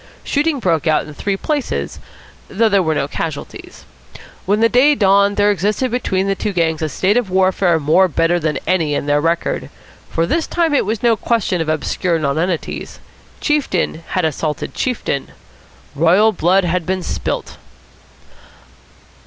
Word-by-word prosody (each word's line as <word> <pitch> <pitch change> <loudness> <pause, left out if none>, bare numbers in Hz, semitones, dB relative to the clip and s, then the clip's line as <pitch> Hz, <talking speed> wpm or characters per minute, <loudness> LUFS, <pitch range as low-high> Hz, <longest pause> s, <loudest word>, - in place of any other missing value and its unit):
Shooting 295 +1 0
broke 170 - 0
out 155 - +2
in 150 - -10
three 195 +6 -2
places, 290 +4 -3 0.5
though 220 +3 +1
there 200 -2 +3
were 160 -3 0
no 140 - -1
casualties. 150 0 -6 0.6
When 205 +2 +2
the 230 - +5
day 265 +6 +4
dawned 200 -2 +3
there 205 0 +4
existed 210 +6 -1
between 195 -6 -1
the 195 - +1
two 200 +1 -3
gangs 165 -3 0
a 155 - -1
state 190 - +1
of 240 -6 0
war 190 0 +2 0.3
more 160 +6 +3
bitter 170 +1 +1
than 155 -2 -1
any 165 -5 +1
in - - -2
their 145 0 +2
record; 165 +2 -1 0.4
for 165 - 0
this 325 - -1
time 335 -3 0
it 280 - +2
was 220 +1 -2
no 235 -1 +4
question 215 -6 0
of 160 - -2
obscure 165 +2 0
nonentities. 160 +3 -2 0.4
Chieftain 275 - 0 0.2
had 180 - +2
assaulted 155 -1 -3
chieftain; 235 - -3 0.6
royal 175 +9 +4
blood 185 +1 +2
had 175 -1 -1
been 185 0 -1
spilt. - - -4
185 Hz, 160 wpm, -18 LUFS, 160-215 Hz, 0.6 s, the